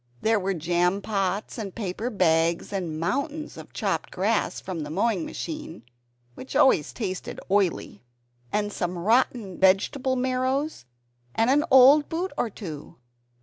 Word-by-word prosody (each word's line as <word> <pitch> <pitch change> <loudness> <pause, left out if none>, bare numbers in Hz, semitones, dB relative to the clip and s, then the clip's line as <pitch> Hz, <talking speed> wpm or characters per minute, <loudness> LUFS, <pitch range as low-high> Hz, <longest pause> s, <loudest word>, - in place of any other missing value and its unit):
There 220 -1 +3
were 195 0 -1
jam 175 +3 +1
pots 200 +1 -2
and 200 -4 -6
paper 215 +2 -3
bags, 170 -3 +1
and 170 -5 -3
mountains 285 - -2
of - - -11
chopped - - -2
grass - - 0
from 185 -3 -6
the 150 -1 -5
mowing 195 +1 0
machine 310 - -6 0.5
(which 260 - -9
always 160 - +4
tasted 190 -6 -5
oily), 190 - 0 0.5
and 205 0 -1
some 175 0 -3
rotten 215 0 +1
vegetable 205 +8 +2
marrows 260 - -1 0.5
and 225 +3 +3
an 295 +2 +4
old 275 +3 +7
boot 350 +3 -2
or 235 - -1
two. 165 -9 -8
205 Hz, 140 wpm, -25 LUFS, 180-260 Hz, 0.5 s, old